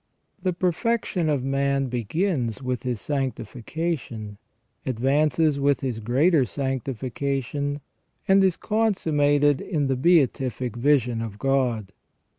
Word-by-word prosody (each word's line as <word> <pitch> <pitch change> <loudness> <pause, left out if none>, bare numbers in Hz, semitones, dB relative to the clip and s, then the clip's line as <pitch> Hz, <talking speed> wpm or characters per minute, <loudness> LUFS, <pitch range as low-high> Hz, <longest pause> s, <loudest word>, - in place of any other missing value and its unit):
* - - -42
The 185 0 +1
perfection 180 0 0
of 140 -4 0
man 135 0 +1
begins 125 - -1
with 125 -1 -2
his 125 -4 -2
sanctification, 130 -4 -4 0.4
advances 140 +4 +1
with 140 0 +2
his 125 -5 -2
greater 135 +8 +3
sanctification, 135 +2 -3 0.5
and 195 0 +5
is 185 -3 +2
consummated 145 -10 +2
in 155 -7 -1
the 135 -1 +1
beatific 130 -5 +2
vision 125 -3 +2
of 110 -3 -6
God. 125 -6 0
135 Hz, 110 wpm, -24 LUFS, 125-155 Hz, 0.5 s, and